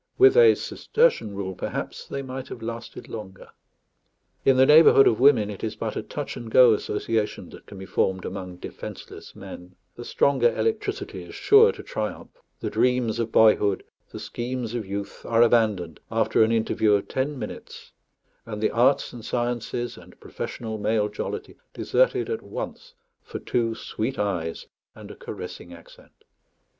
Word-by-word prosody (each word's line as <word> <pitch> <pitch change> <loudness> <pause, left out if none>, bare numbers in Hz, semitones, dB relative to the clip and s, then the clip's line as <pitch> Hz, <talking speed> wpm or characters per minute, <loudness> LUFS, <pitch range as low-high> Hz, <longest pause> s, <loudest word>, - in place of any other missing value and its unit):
With 395 +1 +7
a 470 -2 +7
Cistercian 455 - 0
rule, 95 -1 -4
perhaps - - -5
they 140 0 -5
might 130 0 -6
have 115 - -9
lasted 115 0 -7
longer. 95 -4 -9 0.9
In 135 -1 +4
the 130 - +6
neighbourhood 150 -2 +7
of 110 - +3
women 125 -6 +4
it 100 - -9
is 110 - -3
but - - -4
a - - -2
touch - - -6
and 115 - -8
go 125 0 +7
association 105 +1 -2
that - - -14
can 100 - -11
be 95 - -8
formed 95 0 -1
among 90 -1 -6
defenceless 90 - -9
men; 90 +1 -11 0.2
the 120 - -8
stronger 130 -2 +2
electricity 450 -1 -2
is - - -11
sure 440 +2 +6
to - - -10
triumph; - - -5 0.3
the - - -3
dreams 125 -3 +1
of 115 -1 -2
boyhood, 105 -3 +4 0.3
the - - -7
schemes 120 -1 -4
of 115 -5 -4
youth, 100 +1 -6
are 115 0 +3
abandoned 105 -9 +1
after 110 0 +2
an 110 - +2
interview 110 -1 +2
of 100 - +1
ten 140 +2 -2
minutes, - - -9 0.5
and 105 -2 -7
the 110 - +1
arts 125 +4 +2
and 120 -2 -9
sciences, 120 0 -3
and - - -16
professional 110 -2 -6
male 105 0 +1
jollity, 415 - -6 0.2
deserted - - +1
at 450 0 -3
once - - -7 0.3
for - - -7
two 115 -2 -1
sweet 120 +5 -4
eyes 90 -5 -2 0.3
and - - -11
a - - -10
caressing 85 - -8
accent. 85 -1 -16
115 Hz, 165 wpm, -25 LUFS, 105-130 Hz, 0.9 s, With